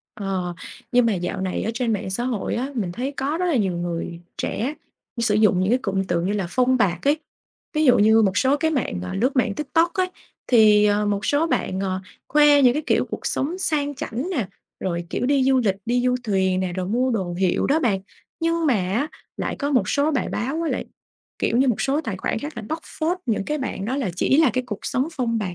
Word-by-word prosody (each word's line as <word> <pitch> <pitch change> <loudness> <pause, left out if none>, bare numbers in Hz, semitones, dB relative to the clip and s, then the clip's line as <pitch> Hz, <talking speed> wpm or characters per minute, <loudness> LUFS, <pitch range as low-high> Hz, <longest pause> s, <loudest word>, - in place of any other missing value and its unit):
Ờ, 190 -4 -3 0.4
nhưng 245 -1 +5
mà 225 - +2
dạo 180 +1 -3
này 185 -1 -2
ở 225 - -1
trên 235 -1 0
mạng 200 -2 -3
xã 240 +6 -2
hội 240 -6 -2
á, 260 +4 -2
mình 195 -7 -2
thấy 260 +8 -3
có 285 +4 -1
rất 365 - 0
là 335 -6 +2
nhiều 190 -6 +1
người 170 0 -4 0.2
trẻ 270 +7 -2 0.4
sử 230 -3 +2
dụng 210 -4 +4
những 185 - +1
cái 250 - +4
cụm 195 -5 -1
từ 175 -2 0
như 185 +4 -1
là 200 -3 -1
"phông 255 +3 +3
bạt" 180 -1 +1
ấy, 295 +2 +3 0.6
ví 310 - +2
dụ 255 - +6
như 220 +2 +5
một 195 -2 +1
số 265 +6 +3
cái 315 +2 0
mạng, 255 - -1
à, 90 - -5
lướt 255 +7 0
mạng 230 -5 +2
TikTok 325 - +1
ấy, 370 -2 +1 0.4
thì, 215 -3 +6
ờ, 210 0 +2
một 205 0 -1
số 290 +3 +2
bạn, 190 - -1
ờ, 190 -1 -2 0.3
khoe 295 -1 +5
những 250 - +6
cái 300 +4 -2
kiểu - - +2
cuộc - - -5
sống 325 +7 -1
sang 290 -5 0
chảnh 265 +5 -4
nè, 250 - -1 0.3
rồi, 170 -2 -2
kiểu, - - -1
đi 275 -1 +3
du 265 0 +4
lịch 205 -6 +1
đi 245 +1 +1
du 250 - +3
thuyền 190 -3 +1
nè, 185 -1 -2
rồi 180 0 -3
mua 250 +5 +1
đồ 190 -7 -2
hiệu 185 0 +1
đó 290 +3 +3
bạn, 205 -8 +1 0.4
nhưng 330 0 +1
mà 265 - +4
á, 205 +9 0 0.3
lại - - -3
có 285 0 -1
một 260 -4 +2
số 285 +2 +2
bài 275 -5 -1
báo 270 +9 -2
với 330 - -1
lại, - - -2 0.5
kiểu - - +1
như, 265 +2 +4
một 240 - +1
số 275 +3 +1
tài 225 -11 -4
khoản 185 - -2
khác 290 +6 -6
là 235 - -5
bóc 315 - -2 0.2
phốt 340 +3 0
những 215 -4 0
cái 300 +6 -2
bạn 260 -7 -4
đó 250 +6 -2
là 260 -9 -1
chỉ 265 - +3
là 315 -5 +5
cái 255 +2 -1
cuộc 210 -4 -4
sống 260 +4 -1
phông 235 -4 -1
bạt 185 -5 -3
235 Hz, 245 wpm, -23 LUFS, 195-280 Hz, 0.6 s, dụ